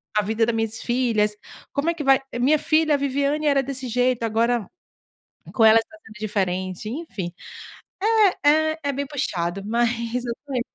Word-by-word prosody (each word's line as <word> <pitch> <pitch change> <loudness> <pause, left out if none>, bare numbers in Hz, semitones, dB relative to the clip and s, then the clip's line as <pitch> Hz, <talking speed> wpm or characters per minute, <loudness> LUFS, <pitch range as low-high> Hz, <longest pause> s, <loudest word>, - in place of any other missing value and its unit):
a 210 - +4
vida 220 +2 0
da 235 - 0
minhas 225 0 -2
filhas? 230 -4 +1 0.4
Como 290 +4 0
é - - +1
que 305 - -5
vai 270 -1 +5 0.2
minha 295 +5 +3
filha, 310 0 +2
a - - +4
Viviane 280 +2 0
era 280 -2 +3
desse 265 -1 -4
jeito 245 0 +1
agora 230 -1 +1 0.9
com 235 - 0
elas 225 +1 +6
tá 320 - -18
sendo 220 - -15
diferente", 190 -2 -2
enfim. 225 - -5 1.1
É, - - +6
é 315 +1 +2
é 285 - 0
bem 280 +1 -3
puxado 195 - -2
mas, 235 +1 -1
eu 240 - -2
tô 280 - -6
in 250 - +1
240 Hz, 180 wpm, -23 LUFS, 220-280 Hz, 1.1 s, elas